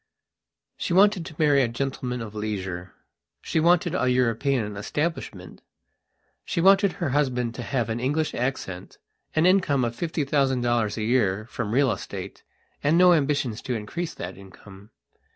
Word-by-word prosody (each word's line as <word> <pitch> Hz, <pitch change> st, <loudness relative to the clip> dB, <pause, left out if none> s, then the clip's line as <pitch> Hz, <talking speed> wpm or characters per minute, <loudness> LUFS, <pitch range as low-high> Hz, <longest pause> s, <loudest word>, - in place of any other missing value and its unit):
She 175 Hz, -, -2 dB
wanted 195 Hz, -2 st, +4 dB
to 165 Hz, -, -10 dB
marry 145 Hz, -3 st, +4 dB
a 125 Hz, -, +2 dB
gentleman 125 Hz, 0 st, -3 dB
of 110 Hz, -2 st, -9 dB
leisure; 95 Hz, -4 st, -5 dB, 0.4 s
she -, -, -1 dB
wanted 175 Hz, +1 st, +3 dB
a 130 Hz, -8 st, +1 dB
European 125 Hz, -2 st, +1 dB
establishment. 105 Hz, -, -4 dB, 0.8 s
She -, -, -3 dB
wanted 195 Hz, +2 st, +5 dB
her 170 Hz, -, -2 dB
husband 125 Hz, -4 st, 0 dB
to 120 Hz, -, -7 dB
have 120 Hz, -1 st, -1 dB
an 115 Hz, +1 st, -2 dB
English 145 Hz, +5 st, 0 dB
accent, 120 Hz, -8 st, -4 dB, 0.4 s
an 155 Hz, +2 st, +3 dB
income 180 Hz, -9 st, +3 dB
of 120 Hz, 0 st, -3 dB
fifty 160 Hz, +1 st, -2 dB
thousand 135 Hz, -3 st, +1 dB
dollars 120 Hz, -3 st, 0 dB
a 110 Hz, -, -2 dB
year 110 Hz, -3 st, +1 dB
from 105 Hz, -, -3 dB
real 130 Hz, +2 st, +3 dB
estate 95 Hz, -, -6 dB, 0.4 s
and 150 Hz, +3 st, +3 dB
no 180 Hz, 0 st, +7 dB
ambitions 140 Hz, -7 st, 0 dB
to 125 Hz, -3 st, -3 dB
increase 160 Hz, +11 st, -5 dB
that 90 Hz, +2 st, -7 dB
income. 100 Hz, +1 st, -14 dB
130 Hz, 155 wpm, -25 LUFS, 110-155 Hz, 0.8 s, no